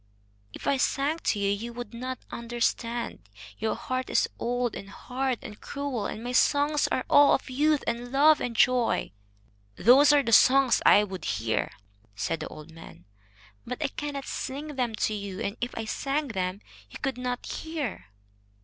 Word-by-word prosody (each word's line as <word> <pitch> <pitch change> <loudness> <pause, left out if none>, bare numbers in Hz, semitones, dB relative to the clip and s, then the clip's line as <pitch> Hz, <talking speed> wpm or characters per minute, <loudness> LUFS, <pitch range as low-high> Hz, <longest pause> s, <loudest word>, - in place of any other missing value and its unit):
"If - - -10
I 275 - +2
sang 280 +5 0
to - - +2
you, 200 0 +1
you 230 +4 -4
would 245 0 -7
not 255 +2 -5
understand. 235 - -3 0.3
Your 220 - -1
heart 255 0 -3
is - - +2
old 245 -1 -1
and 195 - -8
hard 255 +5 -3
and 210 - -10
cruel, 280 -6 -3
and 220 - -6
my 245 - -3
songs 290 +3 +3
are 255 - -1
all 290 0 +6
of 265 - -6
youth 295 +2 +2
and 240 +1 -3
love 295 +3 +5
and 240 -2 -3
joy." 245 - +2 0.6
"Those 270 - +6
are 290 -1 +4
the 230 - -2
songs 260 +3 +6
I 205 - +7
would 190 -5 -6
hear," 110 0 -1 0.5
said 110 +10 -2
the 155 - -5
old 155 +2 -11
man. 160 - -13 0.6
"But 250 +1 -5
I 290 - 0
cannot 285 -1 -5
sing 285 +4 -5
them 245 -4 -1
to 215 - 0
you, 200 -2 -5
and 205 -2 -3
if 245 +1 -2
I 225 - -3
sang 275 +5 -2
them 185 -2 -3 0.3
you - - -9
could 265 -2 -3
not 250 -1 -3
hear." 290 - -5
245 Hz, 175 wpm, -27 LUFS, 215-275 Hz, 0.6 s, I